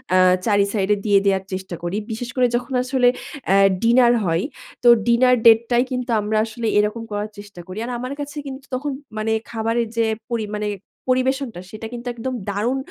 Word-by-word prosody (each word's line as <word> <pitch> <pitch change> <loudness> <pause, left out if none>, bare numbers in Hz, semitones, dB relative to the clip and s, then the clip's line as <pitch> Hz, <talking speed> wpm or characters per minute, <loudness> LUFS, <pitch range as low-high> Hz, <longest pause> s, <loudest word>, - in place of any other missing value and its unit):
আ - - +6 0.3
চারই 205 -2 +3
সাইডে 205 0 +2
দিয়ে 200 -1 +5
দেয়ার 195 -1 +2
চেষ্টা 185 -1 -5
করি। 175 +4 -2
বিশেষ 240 +2 -4
করে 250 -1 +4
যখন 250 +2 -3
আসলে 255 -1 +2 0.4
অ্যা 195 - +4 0.3
ডিনার 240 +1 +5
হয়। 165 0 +1 0.4
তো - - +4 0.2
ডিনার 250 +2 +5
ডেটটাই 235 +2 +5
কিন্তু 250 -1 -2
আমরা 215 +1 -1
আসলে 225 0 -4
এরকম 210 +2 0
করার 205 +1 -3
চেষ্টা 205 -3 -11
করি। 185 +3 -8
আর 250 - -5
আমার 255 +2 -4
কাছে 290 +1 -6
কিন্তু 270 +1 -8
তখন 285 +3 -3 0.3
মানে 220 +1 -1 0.2
খাবারের 230 +1 0
যে 230 - +3 0.3
পরি 225 -2 -1
মানে 210 0 -2 0.4
পরিবেশনটা 255 -5 0
সেটা 220 +1 -7
কিন্তু 240 +1 -7
একদম 245 +2 -4 0.2
দারুণ 225 +7 0
230 Hz, 180 wpm, -21 LUFS, 210-250 Hz, 0.4 s, আ